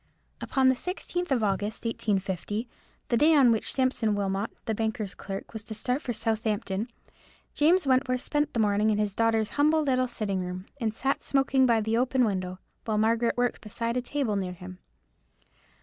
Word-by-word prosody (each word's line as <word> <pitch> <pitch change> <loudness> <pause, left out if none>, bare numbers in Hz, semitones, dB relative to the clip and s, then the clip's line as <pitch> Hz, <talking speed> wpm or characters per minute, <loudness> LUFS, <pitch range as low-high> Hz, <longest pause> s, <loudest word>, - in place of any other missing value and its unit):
Upon 265 -1 +2
the 260 - +6
16th 355 +4 -3
of 250 -5 +1
August, 210 +2 -1
1850, 205 0 -2 0.4
the 235 - +3
day 310 +5 +5
on 265 -5 +6
which 225 - 0
Sampson 255 -5 +1
Wilmot, 200 +1 -1 0.2
the 220 - -1
banker's 220 -2 -2
clerk, 195 +2 -7
was 220 -2 -6
to 220 - -5
start 250 +6 -1
for 245 - -3
Southampton, 220 -2 -1 0.7
James 330 +3 +4
Wentworth 255 -1 +2
spent 295 +1 0
the - - +1
morning 210 0 +3
in 210 - +2
his 210 -2 0
daughter's 225 0 +1
humble 310 +1 +4
little 255 -2 +1
sitting 210 -5 -2
room, 180 +1 -6
and 225 -3 0
sat 270 +5 -1
smoking 270 -1 +3
by 230 -2 +3
the 220 +2 0
open 255 0 +2
window, 185 -3 -2 0.3
while 215 -2 0
Margaret 230 +2 +2
worked 245 0 0
beside 230 +2 -3
a 250 - +1
table 250 -4 -1
near 185 -2 -2
him. 180 0 -10
225 Hz, 180 wpm, -27 LUFS, 205-255 Hz, 0.7 s, the